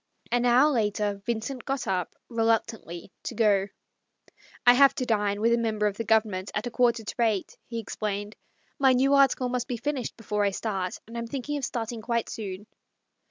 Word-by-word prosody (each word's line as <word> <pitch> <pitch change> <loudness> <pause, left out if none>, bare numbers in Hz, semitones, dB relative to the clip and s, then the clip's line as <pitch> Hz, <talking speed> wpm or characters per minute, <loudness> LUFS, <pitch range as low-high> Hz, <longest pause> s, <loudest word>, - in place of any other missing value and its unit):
An 245 0 +2
hour 255 +5 +5
later 210 -4 0
Vincent 235 +2 -3
got 270 0 -2
up 185 -2 -2
reluctantly 225 -6 -1
to - - -6
go. 205 -4 +3 0.5
" - - -26
I 245 - +9
have 275 +2 +6
to 255 - -2
dine 205 -3 +1
with 230 +1 +4
a 235 - +3
member 215 -2 0
of 205 -1 0
the 230 - -2
Government 210 -3 +1
at 210 - -1
a 245 - -4
quarter 240 -1 +2
to 210 - -6
eight," 220 -5 +1
he 230 -1 -4
ex 225 - -7
plained. 205 0 -3 0.2
" - - -40
My 265 -2 +5
new 270 +2 +3
article 275 -2 +4
must 245 -1 -2
be 245 - -3
finished 265 0 -3
before 210 -2 -1
I 200 - +3
start, 190 -2 -3
and 230 - -11
I'm 235 0 -3
thinking 275 +3 -4
of 275 - -2
starting 230 -1 -4
quite 235 0 -1
soon." 200 -2 -6
225 Hz, 205 wpm, -27 LUFS, 210-245 Hz, 0.5 s, I